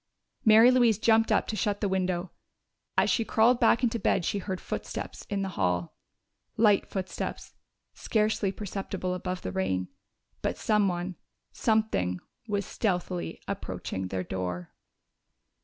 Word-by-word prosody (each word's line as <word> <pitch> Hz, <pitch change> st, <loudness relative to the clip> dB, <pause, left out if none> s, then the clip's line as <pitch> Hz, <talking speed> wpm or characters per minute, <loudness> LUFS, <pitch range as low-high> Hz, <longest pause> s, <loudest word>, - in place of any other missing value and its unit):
Mary 220 Hz, +3 st, +8 dB
Louise 240 Hz, -5 st, +4 dB
jumped 225 Hz, 0 st, +3 dB
up -, -, +3 dB
to 220 Hz, -, -3 dB
shut 205 Hz, 0 st, 0 dB
the 205 Hz, -, 0 dB
window. 185 Hz, -2 st, -1 dB, 0.7 s
As -, -, +4 dB
she 230 Hz, -, +2 dB
crawled 230 Hz, +3 st, +3 dB
back 245 Hz, -, +4 dB
into 235 Hz, -1 st, +1 dB
bed 190 Hz, -3 st, +1 dB
she 200 Hz, -, 0 dB
heard 185 Hz, -1 st, -4 dB
footsteps -, -, -6 dB
in 200 Hz, -1 st, -1 dB
the 195 Hz, -, -2 dB
hall. 90 Hz, -, -1 dB, 0.6 s
Light 210 Hz, -3 st, +4 dB
footsteps, 190 Hz, -1 st, -4 dB, 0.4 s
scarcely 215 Hz, -2 st, 0 dB
perceptible 195 Hz, -2 st, -4 dB
above 180 Hz, 0 st, -4 dB
the 95 Hz, -, -3 dB
rain. 95 Hz, 0 st, -1 dB, 0.5 s
But -, -, -1 dB
someone 190 Hz, -4 st, 0 dB, 0.3 s
something 215 Hz, -, +1 dB, 0.3 s
was 200 Hz, -2 st, -1 dB
stealthily 180 Hz, -4 st, -2 dB
approaching 95 Hz, -, -4 dB
their 95 Hz, 0 st, -3 dB
door! 90 Hz, -1 st, -4 dB
195 Hz, 135 wpm, -28 LUFS, 165-215 Hz, 0.7 s, Mary